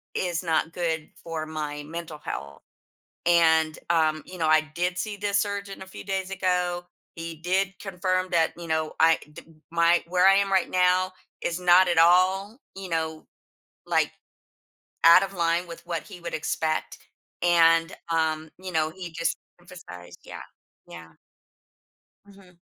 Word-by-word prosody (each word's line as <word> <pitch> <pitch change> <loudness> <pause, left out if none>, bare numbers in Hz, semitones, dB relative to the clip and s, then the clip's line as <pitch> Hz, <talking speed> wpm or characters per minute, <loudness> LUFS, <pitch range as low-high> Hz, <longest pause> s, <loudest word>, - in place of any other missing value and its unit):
is 175 -1 -1
not 165 -1 0
good 160 -3 -2
for 165 -2 -4
my 150 -2 -5
mental 160 0 -7
health." 70 - -7 0.7
And, 160 -2 +4
um, 155 -2 +2
you 185 - -10
know, 160 - 0
"I 155 0 +5
did 180 +1 -1
see 210 +2 -3
this 200 0 0
surgeon 200 -1 -4
a - - -9
few 190 - -10
days 190 -1 -3
ago. 180 -2 -1 0.3
He 165 0 -6
did 190 +2 0
confirm 185 -1 -1
that, 165 -2 +2
you 170 -1 -8
know, 160 -1 -1
I 165 0 +5
d - - -11 0.3
my 170 +1 +3
where 180 +1 +3
I 195 - +7
am 200 0 +1
right 190 -2 +2
now 185 0 +2 0.3
is 170 - -2
not 180 +1 +6
at 175 - +1
all, 185 +6 +4 0.2
you 195 -1 -7
know, 160 -1 -3 0.6
like, - - +1 0.9
out 165 +3 +8
of 195 - -5
line 170 0 0
with 170 0 -10
what 170 -2 -3
he 190 -4 -12
would 170 - -6
expect. 155 0 -2 0.5
And, 165 -1 +4 0.2
um, 160 -1 0
you 185 0 -7
know, 155 -1 +1
he 180 0 -8
just 165 0 -1 0.2
emphasized" 90 - -12
yeah. - - -9 0.5
Yeah. 85 -1 -12 1.1
Mhm. 195 -3 -19
170 Hz, 155 wpm, -26 LUFS, 160-185 Hz, 1.1 s, out